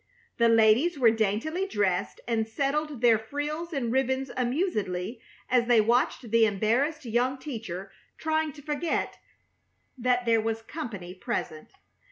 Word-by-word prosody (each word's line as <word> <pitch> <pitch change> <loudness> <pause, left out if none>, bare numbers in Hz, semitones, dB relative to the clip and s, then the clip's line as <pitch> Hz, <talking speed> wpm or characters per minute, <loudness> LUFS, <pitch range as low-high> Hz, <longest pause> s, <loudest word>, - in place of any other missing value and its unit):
The 235 0 +5
ladies 230 +9 +4
were 240 -4 +5
daintily 225 - -1
dressed, 195 - -1
and 225 -2 0
settled 280 +3 -2
their 230 -3 +5
frills 295 +8 -4
and 260 -7 -2
ribbons 265 +1 0
amusedly 240 - -1 0.3
as 245 -1 +2
they 240 -2 +5
watched 235 +1 +1
the 230 -1 +5
embarrassed 245 +9 0
young 245 +3 0
teacher 215 - -6 0.3
trying 315 -1 0
to 290 - -13
forget 300 +3 -2 0.8
that 250 0 +1
there 230 -1 +3
was 225 0 -2
company 215 - -6
present. 160 - -5
240 Hz, 135 wpm, -27 LUFS, 220-290 Hz, 0.8 s, The